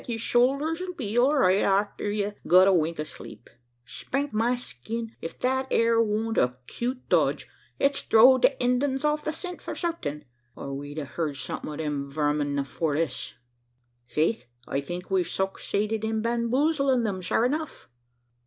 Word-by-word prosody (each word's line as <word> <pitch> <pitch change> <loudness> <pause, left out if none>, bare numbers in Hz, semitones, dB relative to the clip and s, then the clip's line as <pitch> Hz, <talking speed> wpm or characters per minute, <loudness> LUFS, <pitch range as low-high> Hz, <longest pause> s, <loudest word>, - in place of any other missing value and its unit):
yer 235 -2 -2
shoulders 275 +8 +1
'll 365 0 -4
be 225 - -4
all 260 +5 +4
right 195 -7 +4
arter 200 +1 +1
ye've 205 0 -1
got 185 +2 +7
a 195 - +5
wink 165 -2 +1
o' - - 0
sleep. 145 -5 -11 0.3
Spank 275 - -3
my 230 +3 +2
skin! 230 - -5
ef 165 - -6
thet 265 +1 0
ere 230 0 +3
wan't 225 +1 0
a 125 0 +1
cute 250 - -4
dodge - - +2 0.3
it's 275 0 +1
throwd 250 +3 +6
the - - +7
Indyens 260 +3 +1
off 300 0 +1
o' - - -20
the 310 - 0
scent 355 +3 -6
for - - -6
certain; 330 - -3 0.3
or 140 - -6
we'd 145 +2 -7
a 150 - -3
heerd 150 0 -3
some'ut 145 +3 -5
o' - - -2
them 145 -2 -3
verming 145 -1 0
afore 145 +2 -2
this." 150 -5 -2 0.7
"Faith, 160 - 0 0.2
I 140 - -1
think 175 +6 -7
we've 185 -3 +2
sucksaided 205 +3 -2
in 220 0 -1
bamboozling 255 +3 +1
thim, 195 -4 -2
shure 205 +5 +1
enough." 305 +4 -3
220 Hz, 170 wpm, -26 LUFS, 160-255 Hz, 0.7 s, got